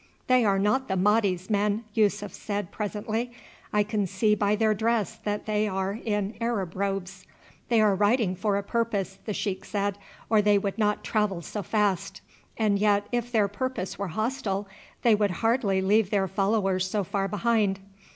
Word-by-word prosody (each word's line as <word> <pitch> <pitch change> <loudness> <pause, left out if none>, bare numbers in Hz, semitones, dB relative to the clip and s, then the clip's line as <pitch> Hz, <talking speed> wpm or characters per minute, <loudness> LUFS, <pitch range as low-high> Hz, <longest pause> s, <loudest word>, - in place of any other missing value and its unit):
"They 255 -1 +4
are 200 -2 +3
not 210 +7 +1
the 190 - -1
Mahdi's 195 -2 +2
men," 210 +1 +1
Yussuf 205 -1 +1
said 205 -4 -4
presently; 215 +3 -3 0.4
"I 210 0 +3
can 205 -1 -1
see 210 +4 +2
by 205 0 +2
their 215 0 +2
dress 220 -2 0
that 205 0 -2
they 215 0 +1
are 195 +2 -2
in 210 -1 -1
Arab 210 -7 -1
robes." 195 -1 -3 0.4
"They 230 -2 +4
are 210 -2 +4
riding 205 0 +2
for 200 +2 0
a 200 - -2
purpose," 200 -3 -2
the 215 - -2
sheik 190 -2 -2
said, 200 0 -2 0.3
"or 215 -1 +4
they 205 0 +4
would 200 +2 -2
not 210 -1 +1
travel 205 -5 0
so 210 - -4
fast, 205 -3 -1 0.4
and 210 -3 +2
yet 205 -1 +3
if 240 0 -1
their 215 -4 +3
purpose 205 -2 -4
were 200 - -2
hostile 210 0 -2 0.4
they 235 - +6
would 210 -1 +2 0.2
hardly 215 -5 +2
leave 205 +1 +3
their 195 -2 +1
followers 195 -1 +1
so 205 +1 0
far 195 +2 -1
behind. 210 -1 +1
205 Hz, 175 wpm, -27 LUFS, 195-220 Hz, 0.4 s, they